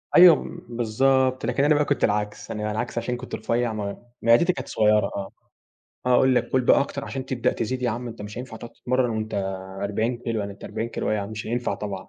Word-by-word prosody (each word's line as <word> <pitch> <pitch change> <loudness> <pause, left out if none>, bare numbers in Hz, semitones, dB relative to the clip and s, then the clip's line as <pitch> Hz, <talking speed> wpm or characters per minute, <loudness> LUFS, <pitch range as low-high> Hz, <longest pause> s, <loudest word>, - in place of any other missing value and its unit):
أيوه، 175 -2 +10
م - - -7
بالضبط، 130 +3 +2
لكن 140 - +1
أنا 150 +1 +5
بقى 150 0 +2
كنت 145 - 0
العكس. 105 0 -1
أنا 105 - -4
على 105 - -1
العكس 115 +3 -3
عشان 120 +1 -1
أنا 125 - -5
كنت 130 - -5
رفيع 120 -1 0
م 100 -2 -4 0.2
معدتي 120 +11 +5
كانت 130 - -6
صغيرة 105 -1 +3
آه. 100 -1 -4 0.8
هاقول 125 +1 +5
لك - - +1
كُل 130 - +2
بقى 125 - +5
أكتر 140 0 -3
عشان 135 -1 -5
تبدأ 125 -3 0
تزيد 125 +3 -3
يا 120 - +2
عم 120 +2 -4
أنت 115 - -8
مش 105 +3 -7
هينفع 125 -3 -7
تقعد 115 - -9
تتمرن 125 -1 0
وأنت 110 -1 -3 0.5
40 110 +4 0
كيلو 115 -3 -2
يعني 100 0 -4
أنت 100 - -13
40 115 - -3
كيلو - - -2
إيه 105 -2 0
مش 110 +1 -6
هينفع 120 +2 -1
طبعًا.، 100 -3 -6
120 Hz, 230 wpm, -24 LUFS, 105-130 Hz, 0.8 s, أيوه